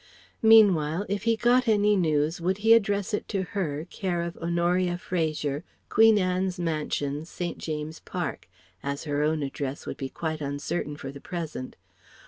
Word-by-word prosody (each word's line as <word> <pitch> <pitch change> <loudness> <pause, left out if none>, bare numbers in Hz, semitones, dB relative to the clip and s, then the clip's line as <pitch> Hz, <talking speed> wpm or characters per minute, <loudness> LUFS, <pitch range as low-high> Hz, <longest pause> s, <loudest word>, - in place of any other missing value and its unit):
Meanwhile 200 -6 +5
if 200 +1 -2
he 230 0 +4
got 245 +3 +3
any 210 -1 +4
news 160 -2 +1
would 185 +3 0
he 225 - +8
address 205 -2 +2
it 210 - -2
to 195 -3 -1
her, 170 -7 -3
care 175 -3 -2
of 170 0 -5
Honoria 175 +1 +1
Fraser, 155 -4 -2 0.3
Queen 225 0 +6
Anne's 185 -1 0
Mansions, 155 -2 -2
St. 175 -1 -4
James's 155 0 -4
Park; 160 - -5 0.3
as 140 0 -3
her 145 -2 -1
own 155 0 +1
address 140 0 -4
would - - -5
be 135 -1 -4
quite 155 0 -4
uncertain 145 +1 -3
for 135 - -6
the 140 0 -11
present. 160 -7 -5
170 Hz, 160 wpm, -27 LUFS, 150-195 Hz, 0.3 s, he